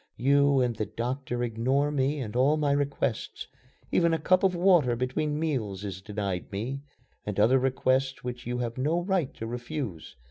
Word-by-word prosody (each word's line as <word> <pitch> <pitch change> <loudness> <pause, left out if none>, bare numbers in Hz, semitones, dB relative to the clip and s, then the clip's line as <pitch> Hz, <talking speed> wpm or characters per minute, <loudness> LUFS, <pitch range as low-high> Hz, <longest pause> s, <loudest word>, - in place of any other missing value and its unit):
"You 140 +1 +4
and 120 -2 0
the 110 -1 -2
doctor 120 +3 -3
ignore 130 +5 +1
me 145 0 0
and 110 -2 -6
all 140 +5 +3
my 145 -2 +1
requests. 140 -5 -1 0.5
Even 170 -1 +3
a - - -3
cup 185 0 +3
of 190 -2 +3
water 175 -9 +4
between 130 +5 -1
meals 115 - -2
is 95 -2 -6
denied 100 -2 -4
me, 120 +8 -4 0.4
and 105 -1 -3
other 120 +6 +5
requests 130 +1 0
which 125 -1 -6
you 125 0 -2
have 120 0 -3
no 160 +6 +1
right 185 -7 0
to 115 - -6
refuse. 120 - -5
130 Hz, 175 wpm, -28 LUFS, 115-145 Hz, 0.5 s, other